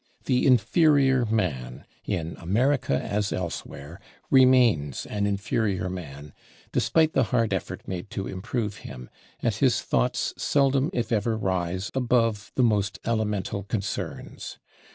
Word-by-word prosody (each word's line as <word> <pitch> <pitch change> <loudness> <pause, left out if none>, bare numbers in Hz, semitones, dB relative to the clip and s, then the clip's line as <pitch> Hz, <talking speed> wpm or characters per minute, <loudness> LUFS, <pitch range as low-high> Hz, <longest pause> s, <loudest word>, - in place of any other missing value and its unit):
The 125 +1 +2
inferior 135 0 +4
man, 90 - -2 0.2
in 85 -1 -3
America 115 - +1
as 100 0 -2
elsewhere, 85 -3 -6 0.3
remains 125 - +4
an 105 -1 -1
inferior 100 -2 -1
man 75 -5 -8 0.4
despite 160 -1 +2
the 130 - +3
hard 115 -1 +1
effort 95 - -4
made 90 +2 -5
to 95 - -4
improve 105 +3 -3
him, 60 -1 -10 0.3
and - - +2
his - - +2
thoughts - - 0
seldom 140 0 +2
if 120 -1 -2
ever 110 0 +1
rise 95 -1 -2
above 115 -4 +1
the 130 - +3
most 105 -3 +1
elemental 105 -4 -1
concerns. 100 0 -5
105 Hz, 125 wpm, -26 LUFS, 90-125 Hz, 0.4 s, inferior